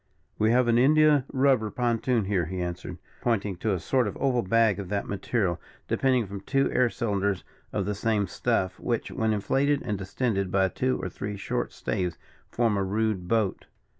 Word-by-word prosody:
"We 110 - +3
have 125 +1 +3
an 120 0 +4
India 150 0 +5
rubber 130 -5 +3
pontoon 120 -1 0
here," 95 -5 0
he 95 +2 -4
answered, 90 -1 -4 0.2
pointing 105 -5 0
to 110 +4 -1
a 95 - 0
sort 125 +6 +1
of 100 - -5
oval 130 -3 +1
bag 110 0 +2
of 95 -3 -6
that 100 -1 -1
material, 100 -3 -1 0.3
depending 130 -3 +2
from 100 0 -7
two 135 +5 +1
air 125 -1 +3
cylinders 100 -5 -1 0.3
of 100 - -1
the 105 - -1
same 105 0 0
stuff, 95 0 -1
which, 120 -2 -2
when 110 -3 0
inflated, 135 +8 +1
and 105 -4 -2
distended 100 -1 -1
by 95 -1 +3
two 130 +5 -1
or - - -3
three 100 +3 -5
short - - -2
staves, 90 -3 -2 0.3
form 115 -3 +1
a 100 - +1
rude 105 -2 -1
boat. 110 -1 0
105 Hz, 185 wpm, -27 LUFS, 95-120 Hz, 0.3 s, India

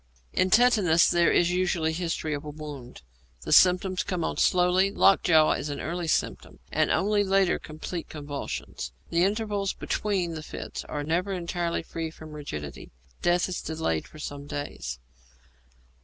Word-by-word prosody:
In 185 - +2
Tetanus 200 -7 +5
there 175 -1 +4
is 175 0 +3
usually 175 -3 +1
history 165 -2 -2
of 145 - -4
a 150 - -7
wound; 145 - -9 0.4
the - - 0
symptoms 185 0 +5
come 180 -3 -2
on - - -2
slowly; 180 +2 +3
lockjaw 170 -6 +4
is 150 - -2
an 145 - -4
early 170 +2 -3
symptom, - - -1
and - - +2
only 205 +1 +2
later 195 -1 +2
complete 160 +2 -6
convulsions; 145 - -5 0.2
the 170 +1 +3
intervals 205 -1 0
between 190 -5 -1
the 160 - -5
fits - - -7
are 145 -1 -4
never 175 +6 0
entirely 170 -1 -2
free 165 0 -4
from 160 -1 -12
rigidity. 75 - -7 0.3
Death 175 0 +2
is 185 - -4
delayed 155 - -2
for - - -15
some 145 -1 -7
days. 145 - -5
170 Hz, 155 wpm, -27 LUFS, 150-185 Hz, 0.4 s, Tetanus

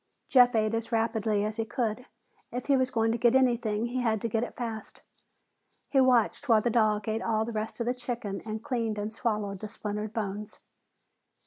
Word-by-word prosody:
Jeff 245 -3 +6
ate 215 0 +2
as 230 +1 -2
rapidly 220 -2 +1
as 215 +1 -3
he 225 - 0
could; 225 +2 -2 0.4
if 245 +1 -4
he 280 - +4
was 260 -1 +2
going 225 -2 +1
to 235 - -1
get 240 +1 +4
anything, 235 -4 +2
he 250 +1 -2
had 220 -3 +1
to 230 - -2
get 225 0 0
it - - -6
fast. 225 -3 -6 0.9
He 270 - +4
watched 255 +2 +2
while 225 -2 +6
the 240 - +1
dog 215 -2 +2
ate 220 +1 -1
all 220 0 0
the 235 - -4
rest 220 +1 -3
of 235 - -1
the 245 - +1
chicken 240 -5 -4
and 220 0 -5
cleaned 230 -4 -1
and 210 +1 -3
swallowed 210 -4 -2
the 215 - -5
splintered 210 0 -4
bones. 210 -1 -4
225 Hz, 205 wpm, -29 LUFS, 215-240 Hz, 0.9 s, Jeff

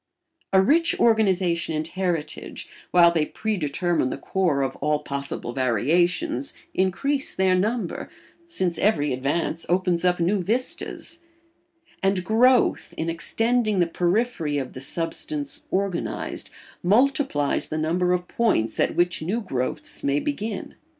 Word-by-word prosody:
A 190 - +5
rich 320 - +3
organisation 185 -7 +2
and 155 +1 -1
heritage, 170 -4 -3 0.2
while 170 -1 +6
they 165 -2 +1
predetermine 175 -6 -1
the - - -4
core 155 -2 0
of 135 -1 -2
all 150 0 +1
possible 140 -4 -5
variations, 135 +4 +1 0.2
increase 270 +10 0
their 190 -1 +3
number, 205 +1 -1 0.4
since 185 - -1
every 150 -10 +2
advance 145 +5 -1
opens 180 -1 +2
up 180 -1 +2
new 185 +4 +1
vistas; 255 - -2 0.8
and 195 -1 +1
growth, 245 +5 +3
in 165 +1 -1
extending 225 +5 +1
the 175 - +4
periphery 175 -2 0
of 135 -2 -4
the 130 - -8
substance 285 - -3
organised, 190 -2 -2 0.3
multiplies 240 - +2
the 155 - -3
number 175 +3 +1
of 180 0 0
points 115 - +1
at - - +1
which 175 -1 +1
new 190 +9 -1
growths 130 - -4
may 140 +1 +2
begin. 220 - -4
180 Hz, 130 wpm, -24 LUFS, 155-215 Hz, 0.8 s, while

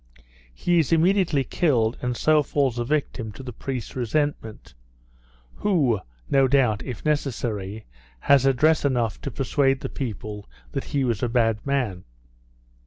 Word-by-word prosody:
He 170 - +1
is 160 - 0
immediately 165 -3 +3
killed, 125 -9 +1
and 125 -1 -2
so 155 -1 +4
falls 135 -4 0
a - - 0
victim 125 -4 -2
to 135 - -10
the 125 -2 -7
priest's 130 0 -5
resentment, 125 - -2 0.8
who, 145 - +2 0.3
no 135 -1 +4
doubt 125 -6 +2
(if 125 +1 -7
necessary), 115 -8 -2 0.4
has 135 -1 +4
address 155 +4 +3
enough 120 -6 0
to - - -4
persuade 135 0 +1
the - - -4
people 105 -5 -6 0.2
that - - -3
he 140 -1 -1
was 120 -5 -1
a 125 - 0
bad 115 -3 +1
man. 120 -10 -1
130 Hz, 145 wpm, -24 LUFS, 115-145 Hz, 0.8 s, so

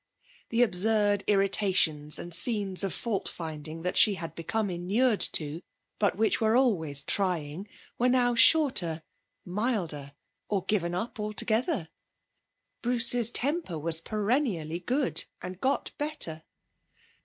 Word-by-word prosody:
The 235 +1 +3
absurd 205 0 +1
irritations 190 -7 +2
and 175 - -6
scenes 200 0 +3
of 195 - -2
fault 220 0 -3
finding 160 0 -7
that 180 - -2
she 210 -3 +6
had 165 -2 -7
become 205 +4 -3
inured 205 +7 0
to, 155 +1 -1 0.4
but 205 -3 +1
which 220 +1 +1
were 220 +1 +2
always 160 - +1
trying, 180 -1 -1 0.3
were 250 +1 +2
now 245 -1 +2
shorter, 230 - +4 0.4
milder, 175 - -3 0.3
or 195 -3 -1
given 175 -4 -1
up 225 +5 -5
altogether. 215 - -1 0.9
Bruce's 240 -1 +4
temper 275 - -1
was 160 +1 +3
perennially 210 - -2
good, 255 +9 -2
and 185 +1 -8
got 270 +2 -1
better. 290 - -1
200 Hz, 120 wpm, -27 LUFS, 165-235 Hz, 0.9 s, she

